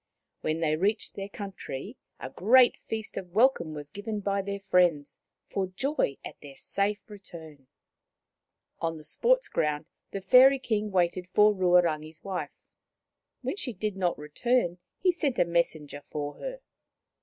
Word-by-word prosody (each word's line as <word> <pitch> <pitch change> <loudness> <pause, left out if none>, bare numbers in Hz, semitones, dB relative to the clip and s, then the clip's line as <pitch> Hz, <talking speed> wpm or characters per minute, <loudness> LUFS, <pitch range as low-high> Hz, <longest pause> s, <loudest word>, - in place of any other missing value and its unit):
When 155 +1 -2
they 155 -1 +2
reached 205 +7 0
their 195 0 -6
coun 200 -1 -6
try, 135 - -6 0.3
a 130 - -7
great 245 - +5
feast 220 -1 -5
of 180 -2 -6
welcome 220 - +3
was 145 -1 -8
given 210 +3 -4
by 200 0 0
their 200 +1 -4
friends, 175 -6 +2 0.3
for 195 -1 -2
joy 190 - -1
at - - -8
their 140 -2 -11
safe 200 +6 -2
return. 165 - -12 1.1
On 165 -1 -2
the 155 - -12
sports - - +2
ground 150 0 -1 0.2
the 195 - -4
Fairy 255 +8 +7
King 215 -5 -1
waited 180 -1 0
for 210 +3 +5
Ruarangi's 170 -4 +2
wife. 190 -2 -5 0.8
When - - -2
she 260 - -3
did 210 +1 -3
not 180 -2 0
return, 175 +5 0 0.2
he 365 - +3
sent 300 -7 -1
a - - +4
messenger 160 -4 -1
for 145 0 -5
her. - - -6
190 Hz, 155 wpm, -28 LUFS, 160-215 Hz, 1.1 s, Fairy